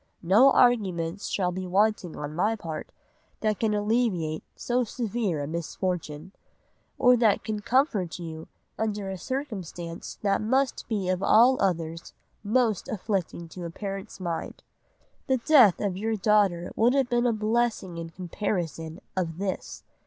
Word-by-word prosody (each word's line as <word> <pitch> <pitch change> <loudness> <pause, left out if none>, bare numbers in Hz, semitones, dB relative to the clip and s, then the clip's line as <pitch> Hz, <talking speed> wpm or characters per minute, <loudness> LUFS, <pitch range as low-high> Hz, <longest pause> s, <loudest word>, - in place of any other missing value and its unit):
No 215 +11 +6
arguments 195 -8 +2
shall 180 -3 0
be 185 +1 -4
wanting 195 -2 +1
on 150 0 -5
my 210 +7 +1
part, 165 -7 -6 0.5
that 215 -2 0
can 215 -2 +1
alleviate 205 -7 0
so 250 +1 0
severe 220 - -2
a - - -4
misfortune; 170 0 -4 0.7
or 250 0 +6
that 225 -4 +3
can 215 -1 -3
comfort 210 - +1
you 160 -2 -7 0.3
under 210 -3 -2
a 190 - -5
circumstance 185 - -5
that 200 0 +2
must 260 +5 0
be 205 -5 -1
of 185 0 0
all 245 +6 +6
others, 165 -3 -2 0.3
most 220 -1 +1
afflicting 195 -7 -3
to 180 +1 -8
a - - -4
parent's 195 +3 -6
mind. 170 -3 -4 0.6
The 265 -1 +3
death 245 - +6
of 200 -3 -1
your 220 +3 -1
daughter 200 -4 +2
would 240 +4 +3
have 270 -3 +2
been 240 0 +2
a - - +3
blessing 215 -5 0
in 165 0 -6
comparison 170 -2 -4
of 170 -3 -2
this. 195 0 -4
200 Hz, 145 wpm, -27 LUFS, 170-225 Hz, 0.7 s, No